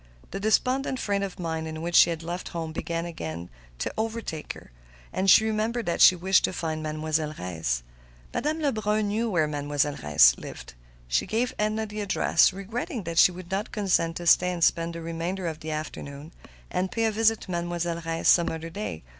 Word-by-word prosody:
The - - -4
despondent 255 +5 +1
frame 200 -2 0
of 195 -2 -4
mind 160 -2 -3
in 155 0 -6
which 170 +2 -4
she - - +7
had 165 -1 -4
left 175 +2 -5
home 160 -1 -3
began 165 +1 -3
again 85 - -6 0.3
to - - -3
overtake 220 -8 -3
her, - - -15 0.4
and 190 +1 +1
she 220 - +7
remembered 220 +2 -1
that 170 - -1
she 185 - +9
wished 185 +2 +3
to - - -3
find 160 -3 -3
Mademoiselle 155 0 -2
Reisz. 80 -10 -2 0.5
Madame 305 +2 -1
Lebrun 215 -6 0
knew 225 +3 0
where 165 -6 +2
Mademoiselle 145 -1 -1
Reisz 75 -5 +6
lived. - - -9 0.3
She - - 0
gave 240 +3 0
Edna 215 +1 0
the 210 0 -6
address, 190 -4 +3
regretting 210 +4 -5
that 170 -1 -1
she - - +7
would 180 0 -10
not 200 +3 -2
consent 185 -6 +1
to 175 - -6
stay 180 +2 +5
and 175 -2 -2
spend 165 +1 +2
the 165 - -6
remainder 170 +3 -3
of 160 -2 -3
the 160 - -7
afternoon, 155 -1 -6 0.4
and 185 +1 -1
pay 225 -1 0
a 220 - +2
visit 225 +1 +2
to 190 - -8
Mademoiselle 170 -1 -2
Reisz 165 0 -3
some 170 -1 +5
other 165 +1 -6
day. 165 - -5
175 Hz, 195 wpm, -26 LUFS, 160-210 Hz, 0.5 s, she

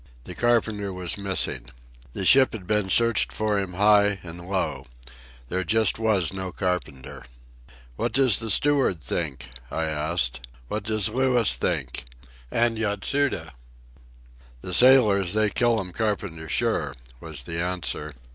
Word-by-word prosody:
The 90 - -9
carpenter 110 -2 0
was 90 -1 -2
missing. 95 -11 -2 0.5
The 95 - -3
ship 130 +6 +6
had 105 -5 -7
been 105 -1 0
searched 115 +2 +3
for 105 -1 0
him 95 -2 -4
high 105 +1 +4
and 85 +1 -10
low. 95 -8 -2 0.6
There 95 +5 -2
just 110 +5 +1
was 105 -6 +1
no 95 -1 -5
carpenter. 90 -9 -4 0.7
"What - - -1
does 130 -5 +3
the 115 -1 -3
steward 135 - +2
think?" 65 -3 -3 0.2
I 80 - -2
asked. 75 -6 -1 0.3
"What 105 -1 -4
does 110 -3 +1
Louis 125 - +2
think?—and 60 - -3
Yatsuda?" 105 - -1 1.1
"The 90 - -5
sailors, 105 -5 +5
they 110 -1 +1
kill 120 +2 +2
'm 90 -2 -6
carpenter 95 -6 -3
sure," - - -1 0.2
was - - -7
the 85 0 -4
answer. 90 -4 -3
95 Hz, 135 wpm, -24 LUFS, 85-110 Hz, 1.1 s, ship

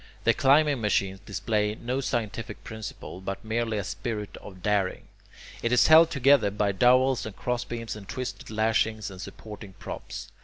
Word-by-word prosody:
The - - +4
climbing 140 -1 +4
machine 95 -2 0
displays 105 +1 -1
no 125 +3 -2
scientific 115 -4 -3
principle, 110 -4 -8
but 95 +4 -5
merely 115 0 -1
a 100 - -1
spirit 105 +1 -4
of 95 -3 -12
daring. 100 -3 0 0.5
It 115 - 0
is 125 - +5
held 160 +1 +8
together 140 -7 +4
by 100 0 0
dowels 125 +5 +4
and 110 - -7
crossbeams 120 -2 -3
and 105 -1 -11
twisted 125 +3 -5
lashings 110 -1 0
and 95 -1 -9
supporting 105 -1 -9
props. - - -8
110 Hz, 155 wpm, -27 LUFS, 105-125 Hz, 0.5 s, held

